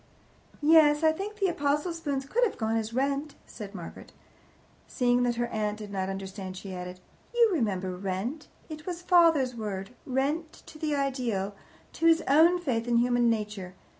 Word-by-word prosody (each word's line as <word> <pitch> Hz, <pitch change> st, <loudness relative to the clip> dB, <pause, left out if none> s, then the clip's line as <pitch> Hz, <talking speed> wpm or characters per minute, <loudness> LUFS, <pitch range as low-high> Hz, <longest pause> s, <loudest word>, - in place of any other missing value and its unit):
"Yes, 300 Hz, -1 st, +6 dB
I 315 Hz, -, +6 dB
think 395 Hz, +6 st, -5 dB
the 400 Hz, -, +1 dB
apostle 295 Hz, +1 st, 0 dB
spoons 285 Hz, -5 st, -3 dB
could 470 Hz, -, +1 dB
have 455 Hz, -, +1 dB
gone 220 Hz, 0 st, 0 dB
as 225 Hz, 0 st, -1 dB
rent," 275 Hz, +4 st, -1 dB
said 205 Hz, -2 st, -9 dB
Margaret. 175 Hz, -3 st, -9 dB, 0.7 s
Seeing 245 Hz, -1 st, +2 dB
that 245 Hz, -1 st, +1 dB
her 240 Hz, 0 st, 0 dB
aunt 210 Hz, -1 st, -2 dB
did 210 Hz, -2 st, -8 dB
not 190 Hz, -1 st, -2 dB
understand, 195 Hz, -1 st, -6 dB
she 190 Hz, 0 st, -7 dB
added: 180 Hz, 0 st, -7 dB, 0.4 s
"You 470 Hz, -2 st, +5 dB
remember 190 Hz, -, -1 dB
'rent.' 195 Hz, -, -4 dB, 0.2 s
It 305 Hz, 0 st, -9 dB
was 360 Hz, -, -2 dB
one 345 Hz, -, -13 dB
of -, -, -23 dB
father's 325 Hz, -8 st, +5 dB
words 200 Hz, -3 st, -5 dB, 0.2 s
Rent 285 Hz, +5 st, -1 dB
to 310 Hz, -, -13 dB
the 300 Hz, -2 st, 0 dB
ideal, 245 Hz, -8 st, -1 dB, 0.4 s
to 330 Hz, -, +1 dB
his 330 Hz, 0 st, +5 dB
own 325 Hz, +6 st, +5 dB
faith 245 Hz, -8 st, -1 dB
in 240 Hz, -1 st, +3 dB
human 245 Hz, 0 st, +3 dB
nature. 210 Hz, -4 st, -3 dB
250 Hz, 180 wpm, -28 LUFS, 210-310 Hz, 0.7 s, Yes